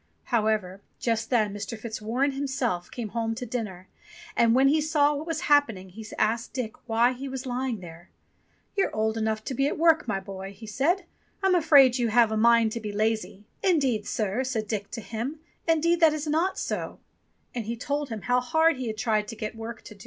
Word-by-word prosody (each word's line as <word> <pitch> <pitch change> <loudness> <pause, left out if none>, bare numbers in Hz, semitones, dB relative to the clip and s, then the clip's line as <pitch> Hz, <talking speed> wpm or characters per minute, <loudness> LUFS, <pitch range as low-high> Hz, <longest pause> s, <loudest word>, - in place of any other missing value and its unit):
However, 210 -4 +1 0.2
just 230 -1 -1
then 215 -5 +2
Mr. 205 +3 -5
Fitzwarren 230 +5 -1
himself 265 -10 -2
came 235 -4 -5
home 225 +1 -2
to 250 +2 -5
dinner, 210 -6 -5 0.5
and 230 0 +4
when 265 +1 +5
he 305 +3 +3
saw 295 -1 +3
what 295 +3 -5
was 330 - -2
happen 285 -8 +3
ing, 185 0 -11
he 220 +5 -10
asked 225 +2 0
Dick 245 -4 -3 0.2
why 235 +3 +3
he 270 +2 -6
was 265 0 -5
lying 250 -4 -2
there. 170 -1 -12 0.7
"You're 395 - +1
old 220 +1 +1
enough 220 -1 -1
to 265 - -4
be 275 +3 +1
at - - -2
work, 320 -3 +4
my 205 -3 0
boy," 195 0 -8
he 220 - -11
said, 305 - 0 0.4
have 260 - +5
a - - 0
mind 230 0 +4
to 230 - -3
be 215 -2 -5
lazy." 215 -1 -1 0.2
"Indeed, 270 - +2
sir," 215 +3 -1
said 230 -5 -2
Dick 205 -2 -3
to 230 - -6
him, 235 +8 -4 0.3
"indeed 330 +1 +3
that 320 -2 +6
is 310 0 -3
not 320 +5 +1
so"; - - -3 0.6
and 235 -3 -3
he 235 - -2
told 285 +3 -2
him 220 -3 -5
how 245 0 +3
hard 320 +3 +2
he 255 -2 -4
had 215 -1 -4
tried 215 -2 +1
to 225 - -6
get 215 0 -5
work 225 +1 -7
to - - -11
do. 200 - -20
235 Hz, 205 wpm, -27 LUFS, 215-275 Hz, 0.7 s, that